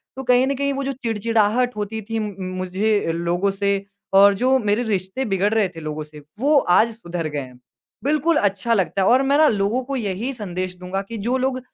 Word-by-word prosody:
तो 265 - -6
कहीं 250 +1 +3
न 275 - 0
कहीं 280 +1 0
वो 275 0 -3
जो 275 - -1
चिड़चिड़ाहट 230 +2 +1
होती 210 +1 -4
थी 225 0 -1
मु 210 -1 -3 0.2
मुझे 190 +1 0
लोगों 175 +3 0
से 200 0 -1 0.3
और 200 +1 +7
जो 255 +6 +2
मेरे 210 +1 0
रिश्ते 205 +3 -2
बिगड़ 200 0 +1
रहे 220 -3 +3
थे 170 -2 -11
लोगों 155 0 -4
से 150 0 -13 0.2
वो 290 +4 +4 0.2
आज 230 +1 +3
सुधर 170 -6 -4
गए 150 -1 -3
हैं। 125 -2 -10 0.4
बिल्कुल 305 +3 +2
अच्छा 205 +2 +1
लगता 195 -1 0
है 190 - +3
और 255 +2 +5
मैं 280 +1 +2
ना 310 0 +6
लोगों 210 +3 0
को 275 +2 -4
यही 220 +1 -2
संदेश 185 -5 -5
दूँगा 180 +2 -4
कि 230 - -5
जो 255 +2 +2
लोग 260 0 -1
210 Hz, 215 wpm, -21 LUFS, 190-250 Hz, 0.4 s, और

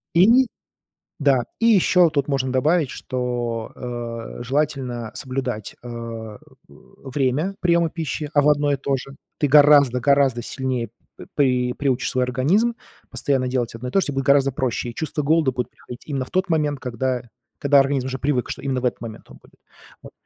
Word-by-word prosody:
И 230 +9 +6 0.7
да, 135 -4 +3 0.2
и 230 - +3
ещё 180 -5 +5
тут 140 -3 -1
можно 135 -2 -1
добавить, 150 +3 +2
что, 120 -4 -3
э, 120 -2 -6
желательно 125 -4 -2
соблюдать, 130 -5 -4
э - - -8
э, 115 -2 -7 0.3
время 140 +7 -3
приёма 170 -2 +3
пищи. 155 -2 -4
А 145 - +5
во 150 +1 +5
одно 145 0 +1
и - - +2
то 135 +1 -1
же. 135 +2 -10 0.2
Ты 145 - +1
гораздо 145 -3 +6
гораздо 140 -2 +3
сильнее 125 -2 -3 0.3
п - - -11
при 125 -3 +2
приучишь 130 -3 -1
свой 130 0 +1
организм 165 - +1 0.4
постоянно 130 0 0
делать 125 -3 -1
одно 125 +2 -6
и - - -10
то 195 - +3
же, - - -2
те 145 - -3
будет 135 0 -2
гораздо 140 0 +4
проще. 125 -2 -2
И 115 - -9
чувство 155 -1 -3
голода 155 -1 +2
будет 125 -1 -3
приходить 120 - -12
именно 135 -4 -3
в - - -17
тот 185 0 0
момент, 150 -3 0
когда 125 0 -2 0.4
когда 140 0 +5
организм 135 -1 +1
уже 130 - -3
привык, 135 -3 0
что - - -5
именно 135 -2 -2
в 125 - -2
этот 125 - -1
момент 115 -2 -9
он - - -13
будет. - - -23 0.5
Вот. - - -12
135 Hz, 185 wpm, -22 LUFS, 125-145 Hz, 0.7 s, И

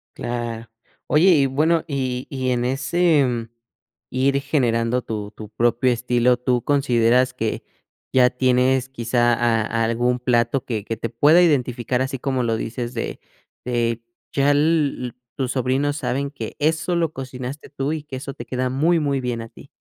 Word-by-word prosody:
Claro, 120 -1 -4 0.4
oye, 160 +6 +4
y 150 -6 +5
bueno 155 +5 +2
y 130 -3 -2
y 130 -2 -2
en 120 -1 0
ese, 150 +4 +2
mm, 120 -2 -3 0.6
ir 135 +2 +1
generando 125 -4 +1
tu 105 -1 -5
tu 105 -1 -10
propio 120 +3 +2
estilo, 120 +1 +2
¿tú 125 -1 0
consideras 125 -3 +2
que 115 -3 -3 0.5
ya 125 -1 +5
tienes 130 +1 +2
quizá 120 -1 +1
a 115 -1 +1
algún 120 +2 +1
plato 125 +1 +1
que 110 -5 -3
que 115 - -3
te 115 - -4
pueda 145 +9 +5
identificar, 125 -6 +1
así 135 +1 -2
como 130 -2 -1
lo 115 -1 0
dices 120 +2 -4
de 115 - -4 0.5
de 120 -2 -1 0.3
ya 140 +1 +3
l 145 -4 +1 0.2
tus 130 -2 -2
sobrinos 135 +3 0
saben 140 0 -2
que 115 -6 -7
eso 160 +3 +1
lo 165 -2 0
cocinaste 130 +1 -7
tú 140 0 -3
y 155 - -3
que 150 -3 -8
eso 135 +1 -6
te - - -9
queda 130 0 -2
muy 160 +6 +2
muy 140 -3 0
bien 120 -2 -3
a 115 - -9
ti? - - -15
125 Hz, 165 wpm, -22 LUFS, 120-140 Hz, 0.6 s, y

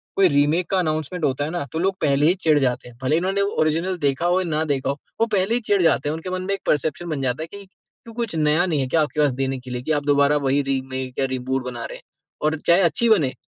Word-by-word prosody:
कोई 195 -1 +5
रीमेक 145 +5 +2
का 195 - +1
अनाउंसमेंट 155 0 -2
होता 140 0 0
है - - -4
ना, 175 -4 -3
तो 160 - -3
लोग 190 +2 +1
पहले 145 0 +3
ही 175 - +5
चिढ़ 155 -4 +4
जाते 125 -2 -1
हैं। 120 - -17
भले 140 +4 +2
ही - - +3
इन्होंने 190 +3 0
वो 200 +1 0
ओरिजिनल 165 +4 0
देखा 140 0 0
हो 175 +1 +3
या 185 - -3
ना 155 0 0
देखा 140 -3 -1
हो, 140 - 0 0.3
वो - - +5
पहले 195 +3 +2
ही - - +1
चिढ़ 205 -3 +1
जाते 155 -3 +2
हैं। - - -1
उनके 165 +3 -6
मन 185 0 -2
में 195 +2 -1
एक 195 - -4
परसेप्शन 155 +4 0
बन 150 -4 -2
जाता 130 +3 -1
है - - -7
कि, 200 +3 -11
"क्यों, 225 +4 -18
कुछ 230 -6 -2
नया 155 +2 +2
नहीं 160 -5 0
है 130 - -1
क्या 160 +5 +2
आपके 150 0 -2
पास 145 -2 +3
देने 135 0 -1
के 125 0 -10
लिए, 125 0 -3
कि 145 - -3
आप 145 -2 +1
दोबारा 145 0 +3
वही 140 +2 +2
रीमेक 130 -1 -4
या 135 - +2
रीबूट 130 +1 -2
बना 120 -2 -5
रहे - - -7
हैं?" - - -18 0.4
और 155 +1 +1
चाहे 175 +3 +6
अच्छी 195 +7 +2
बने, 160 -12 +3
155 Hz, 290 wpm, -22 LUFS, 135-180 Hz, 0.4 s, चाहे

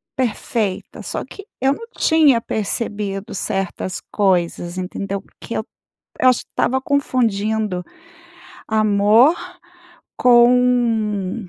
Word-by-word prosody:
perfeita. 225 -5 -2
Só - - -4
que 400 - -12 0.2
eu 265 +1 +3
não 460 +10 -9
tinha 300 -7 +4
percebido 205 -1 -3
certas 190 -1 -3
coisas, 175 -3 0
entendeu, 195 +1 -4
porque - - -10
eu - - -3 0.5
eu 255 - +6
acho 255 - +2
que - - -55
estava 265 +1 0
confundindo, 220 -8 0 0.9
amor 215 +6 +4 0.8
com 240 -5 +3
220 Hz, 100 wpm, -20 LUFS, 195-250 Hz, 0.9 s, eu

